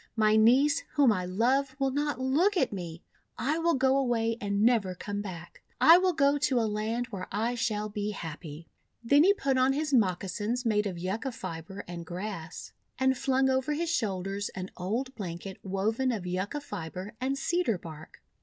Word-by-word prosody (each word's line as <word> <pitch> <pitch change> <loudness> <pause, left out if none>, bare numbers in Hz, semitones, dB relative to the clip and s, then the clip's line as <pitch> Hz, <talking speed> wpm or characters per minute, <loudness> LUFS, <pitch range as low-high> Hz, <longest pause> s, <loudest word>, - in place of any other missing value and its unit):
My 215 -1 +4
niece, 255 +7 +4
whom 280 -5 +5
I 185 -4 -1
love, 260 +8 +1
will 270 -1 +1
not 290 0 -1
look 315 +10 +2
at 335 - +1
me. 175 -3 -6 0.3
I 305 +5 0
will 335 0 +2
go 265 0 +3
away 230 -4 +1
and 200 0 0
never 220 -6 +3
come 205 +2 -4
back. 175 -4 -9 0.2
I 330 +3 +8
will 370 -1 +2
go 285 -2 +3
to 260 -3 +2
a 225 - +1
land 215 +3 -2
where 190 -3 -5
I 225 +4 0
shall 215 -3 -1
be 205 0 -3
happy." 160 -4 -7 0.4
Then 285 +6 +5
he 400 +3 +5
put 270 -7 0
on 260 +1 +4
his 300 +1 -2
moccasins 210 +3 0
made 210 -2 +2
of 185 -3 -5
Yucca 195 +9 -3
fibre 190 -2 -7
and 170 -1 -6
grass, 175 -1 -6 0.2
and 265 0 +2
flung 265 +1 +1
over 265 +2 +1
his 335 +2 -1
shoulders 200 - -2
an 185 0 -5
old 230 +9 -3
blanket 190 -3 -6
woven 215 +7 0
of 210 -6 -4
Yucca 185 +10 -3
fibre 190 - -6
and 270 +2 0
Cedar 335 - 0
bark. 160 -2 -12
225 Hz, 180 wpm, -29 LUFS, 190-265 Hz, 0.4 s, I